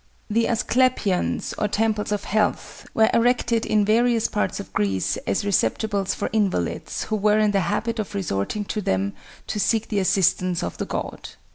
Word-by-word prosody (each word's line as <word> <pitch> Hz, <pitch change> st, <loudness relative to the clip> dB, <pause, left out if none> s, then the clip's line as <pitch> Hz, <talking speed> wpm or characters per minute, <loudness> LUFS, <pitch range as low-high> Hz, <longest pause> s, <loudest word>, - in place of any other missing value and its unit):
The 230 Hz, +2 st, +2 dB
Asclepions, 240 Hz, -4 st, +1 dB
or 210 Hz, -, +1 dB
temples 210 Hz, 0 st, 0 dB
of 210 Hz, -, -1 dB
health, 210 Hz, 0 st, -1 dB
were 220 Hz, 0 st, +4 dB
erected 235 Hz, -1 st, +2 dB
in 210 Hz, -1 st, +3 dB
various 230 Hz, +1 st, +3 dB
parts 210 Hz, -, -2 dB
of 200 Hz, -, -9 dB
Greece 95 Hz, -1 st, 0 dB
as 100 Hz, -, 0 dB
receptacles 200 Hz, -, 0 dB
for -, -, -2 dB
invalids, 195 Hz, -, -1 dB
who 215 Hz, -, -2 dB
were 210 Hz, 0 st, +3 dB
in 215 Hz, -1 st, +3 dB
the 200 Hz, -, +2 dB
habit 230 Hz, 0 st, -1 dB
of 210 Hz, -1 st, -4 dB
resorting 185 Hz, -, -2 dB
to 210 Hz, -, -3 dB
them 95 Hz, -, 0 dB, 0.3 s
to 215 Hz, -, -3 dB
seek 220 Hz, +2 st, +1 dB
the 210 Hz, -, 0 dB
assistance 185 Hz, -1 st, +2 dB
of -, -, -5 dB
the -, -, -1 dB
god. -, -, -5 dB
210 Hz, 170 wpm, -23 LUFS, 190-220 Hz, 0.3 s, were